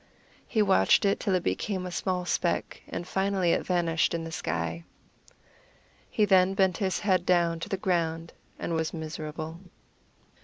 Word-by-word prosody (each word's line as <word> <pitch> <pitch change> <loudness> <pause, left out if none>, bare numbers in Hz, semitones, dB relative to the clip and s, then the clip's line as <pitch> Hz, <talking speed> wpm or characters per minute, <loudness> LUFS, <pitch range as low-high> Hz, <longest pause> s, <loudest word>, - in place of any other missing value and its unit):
He 220 -3 +2
watched 95 - +4
it 200 - +2
till 195 -4 0
it 180 - 0
became 190 -3 -2
a 180 - -5
small 180 +2 -2
speck, 175 -1 -1
and 175 - -5
finally 190 -2 +1
it - - +1
vanished 170 -2 +1
in 165 - -3
the 165 - -6
sky. 85 - -3 1.3
He 210 - +2
then 190 -1 +4
bent 190 -3 +2
his 190 -2 -1
head 185 -4 +2
down 170 -2 +2
to - - -6
the 195 - -1
ground 165 -3 -1 0.2
and 170 - -3
was 160 0 -1
miserable. 160 0 -6
175 Hz, 160 wpm, -28 LUFS, 160-190 Hz, 1.3 s, watched